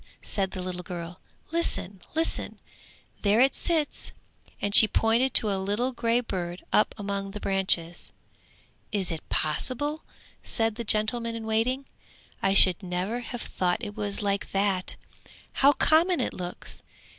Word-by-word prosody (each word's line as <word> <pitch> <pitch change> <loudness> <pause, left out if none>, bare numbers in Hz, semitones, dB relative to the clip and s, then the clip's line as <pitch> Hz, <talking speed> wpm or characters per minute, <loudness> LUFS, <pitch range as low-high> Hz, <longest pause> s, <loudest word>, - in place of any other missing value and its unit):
said 195 -2 -1
the 185 -1 -6
little 180 -1 -4
girl. 175 0 -7 0.3
'Listen, 205 - -1
listen, 325 +1 -1 0.6
there 210 +2 +3
it 265 +2 +4
sits!' 320 -4 -1 0.5
and 205 0 -2
she 220 - +9
pointed 230 +5 +2
to 215 -4 +4
a 190 -1 -1
little 210 +7 -1
grey 235 -1 +1
bird 180 -6 -5
up 210 - +3
among 200 -1 -4
the 210 +1 -7
branches. 185 -4 +1 0.8
'Is 195 -4 -1
it 160 -2 -4
possible?' 275 - -1 0.4
said 225 -1 -1
the 235 +2 -6
gentleman 230 +2 +1
in 225 -1 -6
waiting. 235 +5 0 0.6
'I 195 - +2
should 185 -1 +8
never 185 +5 -3
have 245 0 -6
thought 180 0 -1
it 205 0 -7
was 205 -1 -2
like 200 -1 -1
that. 195 -2 0 0.6
How 280 +1 +5
common 330 +4 +3
it - - -1
looks! 180 -1 -7
205 Hz, 145 wpm, -26 LUFS, 190-240 Hz, 0.8 s, she